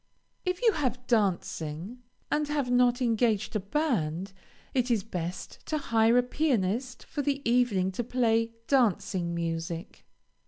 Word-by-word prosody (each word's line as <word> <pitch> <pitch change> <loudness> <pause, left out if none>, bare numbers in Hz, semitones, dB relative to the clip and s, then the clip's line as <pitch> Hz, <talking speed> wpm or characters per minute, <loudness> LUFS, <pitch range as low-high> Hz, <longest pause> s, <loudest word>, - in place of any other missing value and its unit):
If 365 +5 -1
you 460 - +6
have 255 - -2
dancing, 190 -2 -1 0.3
and 300 0 +1
have 290 -4 -1
not 245 0 +3
engaged 225 -3 +1
a - - +2
band, 195 - -1 0.4
it 255 -1 +1
is 225 -5 +2
best 180 -4 -6
to 310 - 0
hire 230 -4 +3
a 245 - +5
pianist 250 -3 0
for 295 - -4
the 280 -1 0
evening 235 -6 +2
to 215 +6 -3
play 230 -2 +1
dancing 190 -9 +1
music. 165 +2 -4
230 Hz, 135 wpm, -28 LUFS, 190-255 Hz, 0.4 s, you